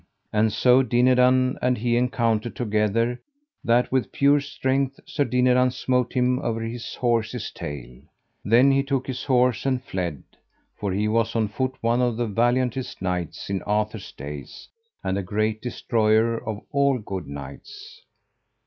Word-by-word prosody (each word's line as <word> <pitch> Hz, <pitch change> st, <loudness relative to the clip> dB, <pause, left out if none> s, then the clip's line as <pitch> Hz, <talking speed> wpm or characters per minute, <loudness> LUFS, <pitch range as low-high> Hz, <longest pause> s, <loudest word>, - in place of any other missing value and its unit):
And 110 Hz, +1 st, +3 dB
so 125 Hz, +4 st, +4 dB
Dinadan 125 Hz, +1 st, +3 dB
and 125 Hz, 0 st, +1 dB
he 120 Hz, +2 st, 0 dB
encountered 120 Hz, -2 st, 0 dB
together, 115 Hz, +1 st, 0 dB, 0.4 s
that 120 Hz, +1 st, +2 dB
with 130 Hz, -1 st, 0 dB
pure 140 Hz, +1 st, +4 dB
strength 135 Hz, -1 st, -1 dB
Sir 150 Hz, -, -1 dB
Dinadan 125 Hz, 0 st, +3 dB
smote 125 Hz, -1 st, -1 dB
him 125 Hz, 0 st, +2 dB
over 115 Hz, -5 st, -2 dB
his 115 Hz, +1 st, -5 dB
horse's 115 Hz, -1 st, -1 dB
tail. 65 Hz, -4 st, -8 dB, 0.4 s
Then 120 Hz, +6 st, +5 dB
he 135 Hz, 0 st, +3 dB
took 135 Hz, -1 st, -2 dB
his 130 Hz, -2 st, -5 dB
horse 125 Hz, -3 st, +2 dB
and 130 Hz, -2 st, 0 dB
fled, 90 Hz, -, -4 dB, 0.5 s
for 100 Hz, -2 st, -3 dB
he 105 Hz, +3 st, 0 dB
was 115 Hz, +1 st, 0 dB
on 110 Hz, -2 st, +1 dB
foot 130 Hz, +4 st, -2 dB
one 115 Hz, +2 st, +2 dB
of 120 Hz, -2 st, 0 dB
the 120 Hz, -, 0 dB
valiantest 120 Hz, +3 st, 0 dB
knights 90 Hz, -3 st, -3 dB
in 100 Hz, -1 st, -2 dB
Arthur's 105 Hz, +1 st, -2 dB
days, 70 Hz, -1 st, -9 dB, 0.4 s
and 95 Hz, +1 st, -1 dB
a -, -, -1 dB
great 110 Hz, +3 st, -1 dB
destroyer 115 Hz, -2 st, +1 dB
of 105 Hz, -1 st, -4 dB
all 140 Hz, -1 st, +2 dB
good 100 Hz, -5 st, -6 dB
knights. 410 Hz, -, -10 dB
120 Hz, 150 wpm, -24 LUFS, 105-130 Hz, 0.5 s, Then